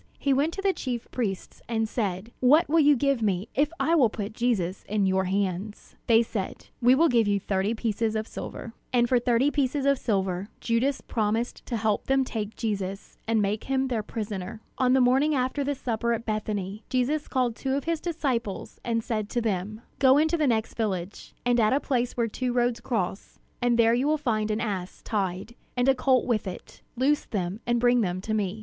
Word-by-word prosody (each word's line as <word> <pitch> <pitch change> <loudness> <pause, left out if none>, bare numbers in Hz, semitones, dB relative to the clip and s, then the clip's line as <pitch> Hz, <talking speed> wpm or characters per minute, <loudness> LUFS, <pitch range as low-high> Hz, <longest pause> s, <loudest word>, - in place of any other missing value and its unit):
He 275 - +1
went 285 +5 +2
to 390 - -5
the 390 -1 +3
chief 245 -6 -4
priests, 200 -7 -3
and 225 -1 0
said: 210 -1 -3
"What 300 +7 +5
will 325 +3 +3
you 295 -1 +6
give 275 -1 +1
me, 200 -1 0
if 290 +3 +2
I 330 - +2
will 270 -9 +5
put 210 -1 -5
Jesus 210 -7 -1
in 205 -1 +1
your 190 0 +2
hands?" 195 +2 -3
They 230 0 +6
said, 210 -4 -5
"We 245 +2 +6
will 330 +5 +5
give 235 -6 +3
you 200 -1 +2
thirty 195 +3 -1
pieces 220 0 -1
of 220 0 -2
silver." 230 - -7 0.2
And 240 -1 +3
for 250 0 +3
thirty 245 +4 +2
pieces 280 -1 0
of 280 -1 +3
silver 190 -3 -1
Judas 245 +4 0
promised 225 +2 -1
to 235 - -1
help 215 -1 0
them 270 0 +3
take 220 -4 -4
Jesus, 195 -3 -4
and 225 -2 +2
make 205 +2 -1
him 265 0 0
their 235 -4 0
prisoner. 210 -2 -5 0.2
On 255 -1 +4
the 265 - +5
morning 270 +5 +3
after 260 +2 0
the 285 +1 -1
supper 235 -2 -1
at 230 0 -3
Bethany, 210 -1 -3
Jesus 270 +4 0
called 250 -4 0
two 265 +2 -2
of 280 - -1
his 330 -1 -1
disciples, 260 - -3
and 230 -1 -1
said 215 -3 -2
to 240 - -1
them: 215 -1 -2 0.2
"Go 265 0 +6
into 315 +3 +3
the 310 -3 +1
next 225 -3 0
village, 195 -4 -4
and 245 0 +3
at 215 +2 +4
a 275 - +3
place 250 -4 -1
where 235 -1 +2
two 250 +3 -2
roads 240 -1 +1
cross; 200 -5 -3 0.2
and 245 -1 +2
there 230 -1 +5
you 250 +4 +1
will 310 +1 +2
find 220 -7 -1
an 215 +1 -1
ass 190 -5 -4
tied, 195 +1 -2 0.2
and 245 +1 +2
a 270 - +6
colt 260 -1 +2
with 220 -5 0
it. 185 - -9 0.2
Loose 285 +4 +2
them, 190 -1 -3
and 240 0 +2
bring 245 0 +4
them 180 -3 -1
to 215 +3 -3
me. 210 -1 -1
230 Hz, 210 wpm, -26 LUFS, 210-260 Hz, 0.2 s, you